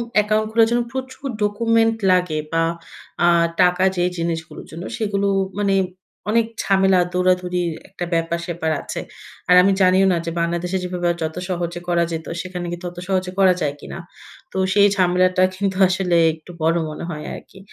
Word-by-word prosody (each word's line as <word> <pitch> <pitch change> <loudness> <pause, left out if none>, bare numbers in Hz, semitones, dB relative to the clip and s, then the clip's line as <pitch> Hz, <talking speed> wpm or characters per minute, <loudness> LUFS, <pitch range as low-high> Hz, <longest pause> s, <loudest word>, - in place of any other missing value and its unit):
Account 215 +1 +2
খোলার 225 0 +4
জন্য 240 0 +2
প্রচুর 260 +1 -6 0.2
ডকুমেন্ট 225 +2 +2 0.2
লাগে 180 -4 +1
বা, 165 0 +2 0.6
আ - - +5 0.3
টাকা 180 +1 +3
যে 175 - +2
জিনিসগুলোর 165 -1 -4
জন্য, 165 +3 -7
সেগুলো 200 -3 0 0.3
মানে 200 -1 +2 0.6
অনেক 230 0 +3 0.2
ঝামেলা, 190 -1 +3
দৌড়াদৌড়ির 180 -1 +1 0.2
একটা 180 -2 -5
ব্যাপার-স্যাপার 170 0 -1
আছে। - - -5 0.5
আর 180 - +7
আমি 195 +2 +4
জানিও 185 +1 +5
না 175 - +1
যে 165 - -2
বাংলাদেশে 175 +2 -1
যেভাবে 180 -1 -2 0.2
যত 160 +1 -3
সহজে 175 -1 -3
করা 170 -1 +2
যেত, 160 0 -4 0.2
সেখানে 180 -1 -6
কিন্তু 175 +1 -6
ওত 175 - -19
সহজে 185 -1 -1
করা 190 -2 +6
যায় 145 -2 0
কিনা? - - -8 0.5
তো - - -6 0.2
সেই 205 0 +6
ঝামেলাটা 185 0 +3
কিন্তু 195 0 -1
আসলে 180 -2 +1 0.2
একটু 160 +2 -13
বড় 165 +2 +2
মনে 155 - -7
হয় 150 -2 -6
আরকি। 190 - -12
180 Hz, 160 wpm, -21 LUFS, 170-195 Hz, 0.6 s, আর